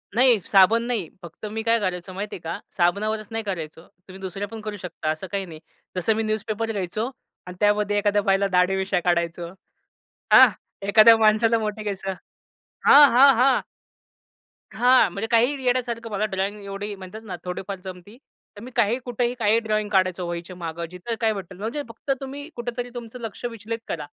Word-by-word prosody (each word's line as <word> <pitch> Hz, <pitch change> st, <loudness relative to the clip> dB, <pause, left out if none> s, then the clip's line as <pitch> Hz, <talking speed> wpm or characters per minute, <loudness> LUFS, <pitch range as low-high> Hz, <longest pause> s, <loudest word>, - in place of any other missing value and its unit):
नाही, 245 Hz, -2 st, +5 dB
साबण 205 Hz, +4 st, +5 dB
नाही. 230 Hz, -9 st, -2 dB
फक्त 170 Hz, +5 st, -10 dB
मी 220 Hz, +1 st, -3 dB
काय 230 Hz, 0 st, +3 dB
करायचो 185 Hz, -2 st, -3 dB
माहितीये 200 Hz, -1 st, -5 dB
का? 165 Hz, 0 st, -5 dB, 0.2 s
साबनावरच 210 Hz, +4 st, 0 dB
नाही 225 Hz, 0 st, -3 dB
करायचो. 165 Hz, -6 st, -5 dB
तुम्ही 190 Hz, 0 st, -15 dB
दुसऱ्या 195 Hz, +2 st, -5 dB
पण 225 Hz, -1 st, -9 dB
करू 210 Hz, -1 st, -6 dB
शकता 175 Hz, -4 st, -5 dB
असं 155 Hz, +4 st, -5 dB
काही 200 Hz, -1 st, -2 dB
नाही. 160 Hz, -3 st, -11 dB, 0.4 s
जसं 185 Hz, +5 st, +1 dB
मी 225 Hz, -, -1 dB
न्यूजपेपर 215 Hz, +1 st, -2 dB
घ्यायचो 210 Hz, +4 st, -3 dB, 0.4 s
अन् 180 Hz, -, -8 dB
त्यामध्ये 205 Hz, 0 st, +2 dB
एखाद्या 205 Hz, 0 st, +2 dB
बाईला 195 Hz, 0 st, +2 dB
दाढी 180 Hz, 0 st, +2 dB
मिश्या 190 Hz, -1 st, 0 dB
काढायचो. 170 Hz, -1 st, -1 dB, 0.8 s
हां, -, -, +9 dB, 0.4 s
एखाद्या 220 Hz, +2 st, +8 dB
माणसाला 225 Hz, +1 st, +4 dB
मोठे 215 Hz, 0 st, -3 dB
केसं 195 Hz, -2 st, -3 dB, 0.7 s
हां, 285 Hz, 0 st, +9 dB
हां, 265 Hz, +2 st, +7 dB
हां. 255 Hz, +1 st, +4 dB, 1.1 s
हां, 250 Hz, -3 st, +5 dB
म्हणजे 200 Hz, +5 st, -4 dB
काहीही 255 Hz, +4 st, +2 dB
येडयासारखं. 240 Hz, -2 st, -1 dB
मला 205 Hz, +1 st, 0 dB
ड्रॉइंग 200 Hz, +1 st, -3 dB
एवढी 200 Hz, +1 st, -5 dB
म्हणतात 190 Hz, +3 st, -10 dB
ना 195 Hz, -5 st, -6 dB
थोडीफार 185 Hz, +2 st, -5 dB
जमती. 185 Hz, +4 st, -10 dB, 0.4 s
तर 205 Hz, -, -11 dB
मी 250 Hz, +3 st, -9 dB
काहीही, 235 Hz, +1 st, +2 dB
कुठेही 245 Hz, 0 st, -1 dB
काही 220 Hz, 0 st, +3 dB
ड्रॉइंग 215 Hz, -2 st, -1 dB
काढायचो, 185 Hz, -3 st, +1 dB
वहीच्यामागं, 170 Hz, -1 st, -5 dB
जिथे 180 Hz, +6 st, -5 dB
काय 220 Hz, -1 st, +2 dB
भेटल, 190 Hz, -2 st, -8 dB
म्हणजे 225 Hz, +9 st, -3 dB
फक्त 230 Hz, +5 st, -5 dB
तुम्ही 280 Hz, +3 st, -7 dB
कुठेतरी 240 Hz, 0 st, -4 dB
तुमचं 240 Hz, 0 st, -8 dB
लक्ष 225 Hz, +1 st, -7 dB
विचलित 230 Hz, -1 st, -5 dB
करा. 155 Hz, -3 st, -4 dB
210 Hz, 170 wpm, -24 LUFS, 185-230 Hz, 1.1 s, हां